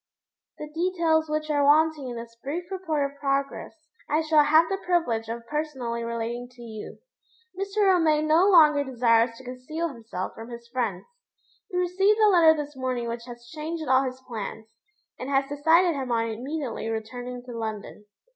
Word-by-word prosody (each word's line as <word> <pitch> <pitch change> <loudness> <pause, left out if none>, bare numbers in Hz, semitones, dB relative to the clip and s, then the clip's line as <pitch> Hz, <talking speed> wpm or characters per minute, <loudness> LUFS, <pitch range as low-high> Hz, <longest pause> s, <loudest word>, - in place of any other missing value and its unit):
The 300 - -6
details 325 -2 +1
which 305 0 -2
are 290 -1 +2
wanting 300 -1 +3
in 240 - -6
this 230 0 -8
brief 340 +6 -4
report 325 -7 -1
of 280 - -22
progress 280 +3 -3 0.2
I 305 +2 +2
shall 310 -1 +4
have 315 +2 +5
the 390 +2 -3
privilege 240 -12 0
of 230 0 -5
personally 260 -5 -3
relating 235 +1 -4
to 240 -1 -13
you. 220 -2 -8 0.6
Mr. 395 +2 -1
Romayne 320 -5 +3
no 335 +6 +5
longer 300 -6 +6
desires 230 -3 +2
to 260 - -13
conceal 270 +7 -4
himself 225 -8 -6
from 225 +1 -10
his 235 0 -9
friends. 230 -7 -2 0.6
He 360 - -3
received 380 +4 +2
a 430 -1 +6
letter 330 -4 +6
this 295 -1 -5
morning 255 -2 -2
which 235 0 -5
has 240 -1 -11
changed 315 +4 -5
all 260 +1 +5
his 260 -1 -4
plans, 220 -1 -7 0.5
and 255 - -5
has 270 0 +2
decided 325 +5 +3
him 265 -4 -4
on 230 -1 +1
immediately 255 +1 -4
returning 245 +3 -5
to 250 - -10
London. 215 -2 -6
275 Hz, 175 wpm, -26 LUFS, 235-320 Hz, 0.6 s, longer